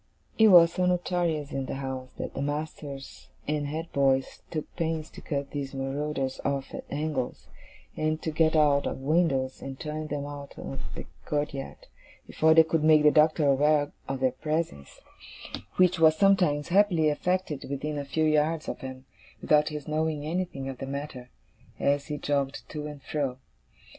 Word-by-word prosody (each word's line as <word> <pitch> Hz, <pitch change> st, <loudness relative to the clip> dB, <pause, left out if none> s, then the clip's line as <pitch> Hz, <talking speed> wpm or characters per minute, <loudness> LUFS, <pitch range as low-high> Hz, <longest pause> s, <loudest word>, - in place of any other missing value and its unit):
It 220 Hz, -, +8 dB
was 170 Hz, -4 st, +8 dB
so 180 Hz, 0 st, +1 dB
notorious 175 Hz, -4 st, 0 dB
in 135 Hz, -1 st, -3 dB
the -, -, -3 dB
house, 130 Hz, -1 st, -5 dB
that -, -, -5 dB
the -, -, -4 dB
masters 145 Hz, -1 st, -5 dB, 0.2 s
and 150 Hz, -1 st, -1 dB
head 160 Hz, +3 st, -5 dB
boys 135 Hz, -1 st, +1 dB
took 155 Hz, -2 st, -5 dB
pains 160 Hz, -2 st, -2 dB
to -, -, -11 dB
cut 140 Hz, -2 st, -3 dB
these 140 Hz, -2 st, -4 dB
marauders 135 Hz, 0 st, -2 dB
off 140 Hz, -1 st, -2 dB
at -, -, -6 dB
angles, 145 Hz, -3 st, -3 dB, 0.5 s
and 155 Hz, 0 st, 0 dB
to 160 Hz, -, -1 dB
get 160 Hz, +1 st, +2 dB
out 145 Hz, -2 st, +4 dB
of -, -, -3 dB
windows, 135 Hz, -2 st, +1 dB
and 135 Hz, -1 st, -7 dB
turn 155 Hz, 0 st, -4 dB
them 145 Hz, -1 st, -3 dB
out 145 Hz, -1 st, -8 dB
of 70 Hz, +1 st, -6 dB
the -, -, -6 dB, 0.2 s
courtyard, 145 Hz, -2 st, -3 dB, 0.4 s
before 160 Hz, 0 st, +3 dB
they 160 Hz, -, +9 dB
could 160 Hz, -1 st, 0 dB
make 155 Hz, -1 st, +6 dB
the 150 Hz, -, +7 dB
Doctor 155 Hz, 0 st, +4 dB
aware 145 Hz, +1 st, +3 dB, 0.2 s
of 135 Hz, -1 st, -3 dB
their 130 Hz, -1 st, +3 dB
presence; 150 Hz, -, -3 dB, 0.7 s
which 180 Hz, -1 st, +4 dB
was 160 Hz, -1 st, +6 dB
sometimes 180 Hz, -7 st, +3 dB
happily 180 Hz, -5 st, +4 dB
effected 170 Hz, -1 st, -1 dB
within 145 Hz, +2 st, -3 dB
a -, -, -3 dB
few 150 Hz, +3 st, -1 dB
yards 155 Hz, +1 st, +1 dB
of -, -, -4 dB
him, 130 Hz, 0 st, -8 dB, 0.3 s
without 150 Hz, 0 st, +3 dB
his 150 Hz, -2 st, -6 dB
knowing 155 Hz, -1 st, -1 dB
anything 165 Hz, -5 st, -3 dB
of 135 Hz, -2 st, -6 dB
the 135 Hz, -, -5 dB
matter, 140 Hz, -2 st, -6 dB, 0.5 s
as 140 Hz, 0 st, +1 dB
he 150 Hz, -2 st, -3 dB
jogged 140 Hz, -1 st, -2 dB
to 150 Hz, -1 st, -5 dB
and 145 Hz, -2 st, -9 dB
fro. 140 Hz, -4 st, -2 dB
150 Hz, 175 wpm, -28 LUFS, 140-160 Hz, 0.7 s, they